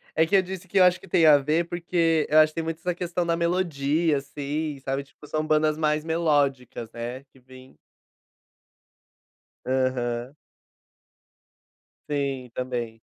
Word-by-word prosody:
É 160 - +4
que 200 - +1
eu 190 - +6
disse 185 0 -8
que 195 +2 +1
eu - - +8
acho 180 0 +4
que - - -15
tem 165 -4 +4
a 145 -1 +8
ver, 155 +5 0
porque 170 -2 +1
eu 155 +1 +6
acho 155 0 +6
que - - -28
tem 165 - -2
muito 165 0 -4
essa 180 0 -2
questão 175 0 -2
da 170 0 0
melodia, 165 -3 +1
assim, 145 +1 -4
sabe, 135 +1 -2
tipo, 140 +2 -17
são 155 0 -2
bandas 155 0 +2
mais 150 -1 +1
melódicas, 145 -8 0
né, 120 +3 -6
que 135 -1 -24
vem 130 +1 -16 1.9
Aham. 130 0 -1 1.7
Sim, 135 -3 -2
também. 120 -3 -4
150 Hz, 155 wpm, -25 LUFS, 135-165 Hz, 1.9 s, eu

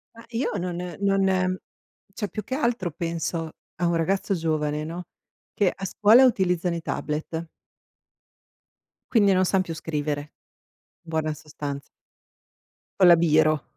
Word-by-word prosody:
Ma 230 - -12
io 235 +2 -1
non 180 -1 -3 0.3
non 190 -2 +2 0.6
cioè, 205 -1 -3
più 215 +3 -5
che 260 - -3
altro 235 - 0
penso 165 0 -3 0.2
a 175 - -1
un 170 - +1
ragazzo 190 +4 0
giovane, 155 -3 -1
no, 170 +3 -5 0.5
che 200 -3 +2
a 195 - -6
scuola 220 +6 +6
utilizzano 180 -7 +1
i 170 - -4
tablet 160 +2 -3 1.7
quindi 205 -5 +5
non 185 0 +3
san 185 0 +2
più 170 - -5
scrivere, 150 -2 -2 0.8
in 165 - -16
buona 155 -1 -1
sostanz 145 -2 -7 1.1
Con 185 - +7
la 175 - +9
biro. 155 -2 +3
175 Hz, 135 wpm, -25 LUFS, 155-195 Hz, 1.7 s, la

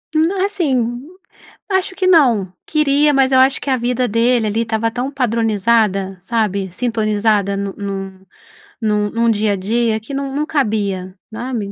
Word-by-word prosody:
Não, 365 +5 +2
assim, 260 - -1 0.7
acho 380 -1 0
que 375 -1 -1
não. 240 - +3
Queria, 295 -1 +3
mas 270 -1 +3
eu 260 - +5
acho 265 +1 +4
que - - -4
a 260 - +2
vida 245 +1 0
dele 230 +1 +2
ali, 215 +2 0
estava 225 0 -1
tão 250 +4 -3
padronizada, 220 -6 +1
sabe? 200 -2 -1
Sintonizada 215 -2 0
no 200 -1 -3
num 195 -1 -6 0.6
num 210 -1 0
num 230 0 +2
dia 210 -1 +1
a - - 0
dia 220 +3 0
que 225 +6 -10
num 275 0 -3
num 300 +1 0
cabia, 200 -10 -1 0.2
sabe? 225 -4 -4
230 Hz, 160 wpm, -18 LUFS, 205-265 Hz, 0.7 s, eu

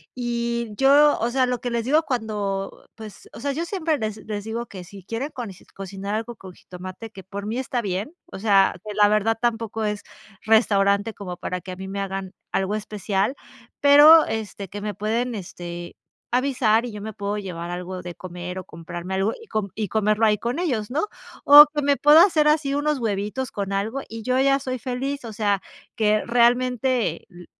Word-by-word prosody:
y 235 -1 -2
yo 285 +2 +5
o 235 - 0
sea, 260 +1 +2
lo 250 -1 -2
que 245 - -2
les 235 -1 -1
digo 305 +4 +3
cuando, 205 -6 -3
pues 220 -2 -11
o - - -10
sea, 280 +3 -2
yo 330 +4 -3
siempre 330 -5 -1
les 215 -2 -3
les 205 -2 -4
digo 230 +2 -4
que 185 -2 -9
si 190 +1 -13
quieren 230 +8 -4
con 240 -5 -6 0.3
cocinar 195 +1 -5
algo 230 +2 -4
con 190 -2 -12
jitomate, 185 +6 -10
que 190 -2 -11
por 200 +2 -7
mí 225 +3 -3
está 245 -1 -2
bien, 200 - -3
o 265 - -9
sea, 200 -2 +4
que 210 -1 -6
la 210 -1 +5
verdad, 215 +2 +2
tampoco 225 -2 -1
es 210 -1 -3 0.4
restaurante 205 -1 +3
como 180 -3 -7
para 180 0 -4
que 185 - -8
a - - -7
mí 190 +1 -8
me 200 +1 -4
hagan 195 -1 -5 0.2
algo 195 +2 0
especial 210 +2 -2 0.5
pero, 295 +3 +8
este, 205 -3 -5
que 205 0 -7
me 210 0 -3
pueden, 225 +4 -2
este, 175 -2 -7 0.4
avisar, 245 -4 +2
y 240 - -6
yo 210 - -7
me 220 0 -6
puedo 205 +1 -3
llevar 175 -4 -6
algo 180 +1 -5
de 175 -1 -8
comer 180 0 -7
o - - -7
comprarme 170 +3 -7
algo, 195 +3 +1
y 455 - -13
com 210 -2 -2
y 215 -2 -2
comerlo 215 +1 +2
ahí 210 -1 +3
con 240 +5 -2
ellos, 245 -12 -1
¿no?, 310 +9 0 0.4
o 295 +1 +11
que 295 - 0
me 285 0 +3
puedo 295 +2 +6
hacer 315 -6 +4
así, 300 -2 +2
unos 295 0 0
huevitos 215 +3 -2
con 200 -1 -4
algo, 220 +7 -2
y 225 0 -7
yo 255 +2 +1
ya 275 0 +4
soy 255 -2 -4
feliz, 265 +1 -4
o 220 - -7
sea, 205 -2 0 0.3
que 215 -1 +2
realmente 245 +1 +1
lo 175 -1 -13
220 Hz, 200 wpm, -23 LUFS, 195-250 Hz, 0.5 s, o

